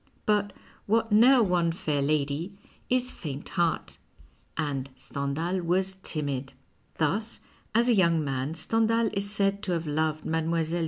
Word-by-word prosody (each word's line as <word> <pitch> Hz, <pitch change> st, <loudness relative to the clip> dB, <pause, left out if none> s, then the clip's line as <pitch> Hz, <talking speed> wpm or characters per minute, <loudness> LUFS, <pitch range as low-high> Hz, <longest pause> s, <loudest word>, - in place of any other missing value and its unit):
but 205 Hz, -1 st, +2 dB, 0.4 s
what 225 Hz, +1 st, +2 dB
neer 240 Hz, +4 st, +7 dB
won 175 Hz, -4 st, +2 dB
fair 150 Hz, -4 st, -1 dB
lady 150 Hz, +6 st, -1 dB, 0.3 s
is 255 Hz, 0 st, +2 dB
faint 145 Hz, -3 st, -6 dB
heart, 170 Hz, -3 st, -1 dB, 0.6 s
and 140 Hz, -4 st, -2 dB
Stendhal 140 Hz, +7 st, -2 dB
was 185 Hz, +2 st, 0 dB
timid. 140 Hz, -6 st, -3 dB, 0.4 s
Thus, 210 Hz, +9 st, -1 dB, 0.4 s
as 235 Hz, +1 st, +4 dB
a 245 Hz, -, +5 dB
young 170 Hz, -6 st, +3 dB
man 135 Hz, +2 st, -2 dB
Stendhal 225 Hz, +5 st, +1 dB
is 200 Hz, 0 st, -1 dB
said 200 Hz, -1 st, 0 dB
to 185 Hz, -, -2 dB
have 165 Hz, -1 st, -2 dB
loved 155 Hz, +1 st, -1 dB
Mile. 160 Hz, 0 st, 0 dB
170 Hz, 140 wpm, -27 LUFS, 150-205 Hz, 0.6 s, neer